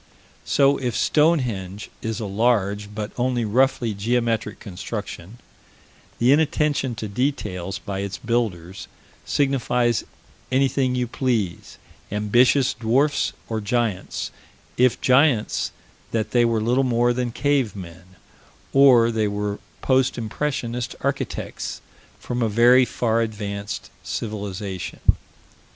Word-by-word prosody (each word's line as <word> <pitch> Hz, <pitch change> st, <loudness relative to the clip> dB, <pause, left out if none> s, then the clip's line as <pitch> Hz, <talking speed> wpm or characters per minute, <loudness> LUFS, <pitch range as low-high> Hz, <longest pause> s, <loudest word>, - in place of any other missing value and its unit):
So, 140 Hz, 0 st, +3 dB
if 125 Hz, -4 st, -2 dB
Stonehenge 120 Hz, -, +1 dB
is 110 Hz, 0 st, -3 dB
a 110 Hz, -, -3 dB
large, 105 Hz, -1 st, +1 dB
but 105 Hz, -1 st, -4 dB
only 120 Hz, -1 st, +1 dB
roughly 120 Hz, 0 st, +2 dB
geometric 115 Hz, +2 st, -1 dB
construction, 100 Hz, 0 st, -7 dB, 0.8 s
the 120 Hz, +2 st, +4 dB
inattention 145 Hz, -3 st, +2 dB
to 110 Hz, -1 st, -5 dB
details 100 Hz, -6 st, -2 dB
by 100 Hz, 0 st, -5 dB
its 100 Hz, 0 st, -4 dB
builders 105 Hz, -7 st, -2 dB, 0.4 s
signifies 125 Hz, -4 st, +1 dB, 0.5 s
anything 130 Hz, -1 st, +2 dB
you 125 Hz, -1 st, 0 dB
please 115 Hz, -7 st, -2 dB, 0.3 s
ambitious 120 Hz, +6 st, +3 dB
dwarfs 130 Hz, +6 st, +1 dB
or 110 Hz, -1 st, -2 dB
giants 105 Hz, -2 st, -2 dB, 0.4 s
if 125 Hz, 0 st, +3 dB
giants, 130 Hz, -3 st, +3 dB, 0.4 s
that 110 Hz, -1 st, -2 dB
they 120 Hz, -1 st, +4 dB
were 115 Hz, -2 st, +1 dB
little 125 Hz, +4 st, +2 dB
more 120 Hz, -1 st, +2 dB
than 125 Hz, -1 st, -2 dB
cave 135 Hz, -5 st, +1 dB
men, 90 Hz, 0 st, -11 dB, 0.6 s
or 125 Hz, -4 st, +6 dB
that 115 Hz, -, -3 dB
they 105 Hz, -, +2 dB
were 105 Hz, 0 st, -3 dB, 0.2 s
post 130 Hz, -1 st, +2 dB
impressionist 120 Hz, 0 st, -3 dB
architects -, -, -3 dB, 0.4 s
from 120 Hz, 0 st, -3 dB
a 115 Hz, -, +2 dB
very 120 Hz, +4 st, +6 dB
far 115 Hz, -1 st, 0 dB
advanced 100 Hz, -2 st, -4 dB
civilization. 100 Hz, -4 st, -5 dB
115 Hz, 115 wpm, -23 LUFS, 105-125 Hz, 0.8 s, or